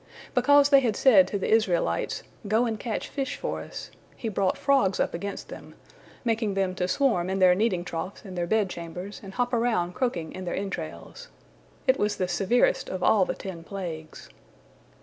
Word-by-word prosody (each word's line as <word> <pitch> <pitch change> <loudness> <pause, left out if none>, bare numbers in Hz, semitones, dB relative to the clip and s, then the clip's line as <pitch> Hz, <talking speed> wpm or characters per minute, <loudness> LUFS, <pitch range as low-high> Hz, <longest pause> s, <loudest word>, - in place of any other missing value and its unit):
Because 285 +3 +5
they 280 -1 +7
had 235 -6 0
said 200 -9 +6
to 200 - -2
the 195 - -2
Israelites, 180 - +1 0.2
"Go 220 +4 +3
and 220 -2 -2
catch 225 -1 -3
fish 275 -1 -3
for - - -3
us," - - -8 0.3
He 230 - -3
brought 195 -2 0
frogs 265 -10 +2
up - - 0
against 200 +4 -5
them, - - -10 0.5
making 220 -3 0
them 190 -1 0
to 180 -1 -1
swarm 185 -7 +1
in 190 - -1
their 185 -1 +6
kneading 185 -3 0
troughs 185 +3 -5
and 190 -2 -8
their 175 -1 -1
bed 215 +1 +2
chambers 180 +3 -7
and 195 -1 -10
hop 245 0 0
around 230 -7 +1
croaking 180 -11 -2
in 185 - -6
their 175 - -2
entrails. 195 - -6 0.6
It 260 -1 +3
was 210 0 +1
the 185 - -1
severest 200 +6 +2
of 185 -1 -4
all 200 -4 +5
the - - -3
ten 180 -4 -7
plagues. 165 -4 -7
195 Hz, 190 wpm, -26 LUFS, 180-235 Hz, 0.6 s, they